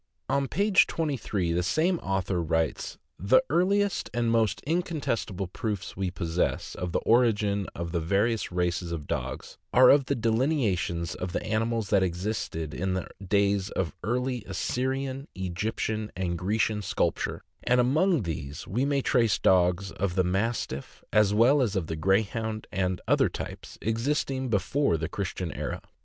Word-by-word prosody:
On 140 0 +1
page 200 +5 +4
23 120 - -1
the 85 - +1
same 160 - +1
author 95 -2 -1
writes: 80 -1 -1 0.2
"The 100 +9 +4
earliest 195 +4 +2
and 120 -1 +1
most 110 -4 +2
incontestible 140 - -1
proofs 105 +1 -4
we 95 -1 -1
possess 85 0 -1
of 90 -1 -4
the - - +1
origin 105 -4 +2
of 85 0 -4
the 85 - 0
various 100 +7 0
races 90 0 -1
of 80 -3 -4
dogs - - -4
are 130 +2 +8
the 135 - -2
delineations 110 - 0
of 90 -1 -5
the - - -2
animals 110 -1 -1
that 100 -2 +5
existed 90 -4 -2
in 95 +7 -1
the 95 - -4
days 100 +1 +2
of 85 -6 -2
early 125 +2 -1
Assyrian, 130 - -2
Egyptian, 105 +4 -2
and 90 -2 -1
Grecian 105 +4 0
sculpture, 100 - -1 0.2
and 125 +1 +3
among 155 - +3
these 75 -4 -5
we 120 +9 0
may 140 -1 +1
trace 115 -8 +3
dogs 90 +1 +3
of 95 -2 -2
the 95 - +3
Mastiff, 95 - -2
as 105 -1 +5
well 120 +7 +5
as 115 -6 +1
the 80 -5 -2
Grey 95 +7 +3
hound 110 +1 -4
and 90 -1 -1
other - - +4
types, - - -7
existing 130 +3 -1
before 105 - +1
the 80 +1 -2
Christian 95 -3 -4
era. - - -4
105 Hz, 150 wpm, -27 LUFS, 90-125 Hz, 0.2 s, are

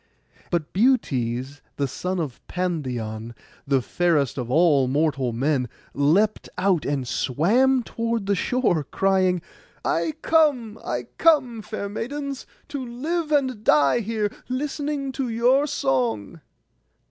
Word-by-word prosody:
And 170 -3 +1
Butes, 140 - +1
the 140 - 0
son 180 +7 -3
of 145 -7 -4
Pandion, 125 -11 -3 0.3
the 135 -2 +2
fairest 160 -6 +1
of 120 -1 -4
all 145 -2 +4
mortal 135 -2 +1
men, 130 +1 0 0.2
leapt 175 +10 +2
out 185 -4 +2
and 135 -3 -1
swam 235 - +2
toward 230 -2 -2
the 200 - +2
shore, 195 - +1
crying, 185 +2 +1 0.4
'I 315 - +1
come, 280 -9 +2
I 125 0 -2 0.2
come, 260 -9 +3
fair 210 -1 -5
maidens, 275 +6 -5 0.2
to 280 -3 -4
live 300 +7 -3
and 260 -7 +1
die 150 - +4
here, 215 -2 -1 0.2
listening 285 +1 -2
to 260 -2 -3
your 250 +5 +3
song. 130 - -1
190 Hz, 125 wpm, -24 LUFS, -, 0.4 s, all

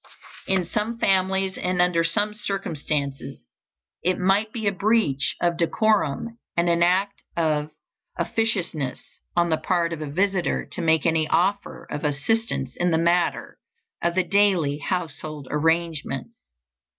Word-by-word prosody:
In 190 -2 +1
some 215 +6 -2
families 190 -2 +1
and 180 0 -1
under 175 -2 +3
some 205 +5 +1
circumstances 155 -9 -3 0.6
it 185 +1 +1
might 195 +4 +2
be 220 -2 -5
a 200 - +3
breach 195 -8 +1
of 175 -1 +1
decorum 215 +3 +1 0.2
and 170 +1 +3
an 170 0 +2
act 190 +3 +2 0.2
of 155 -2 +1 0.5
officiousness 180 - -1 0.4
on 170 -1 +2
the 160 - +3
part 170 -1 0
of 160 - -6
a 155 - -4
visitor 190 +3 0
to - - -4
make 160 -3 +2
any 160 -2 +2
offer 185 +6 0
of 150 - -4
assistance 150 - -1
in 175 - +2
the 160 - +2
matter 170 +1 +1 0.4
of 170 0 0
the 185 - +3
daily 180 -7 +2
household 155 -4 -4
arrangements. 160 -3 0
175 Hz, 140 wpm, -24 LUFS, 155-195 Hz, 0.6 s, under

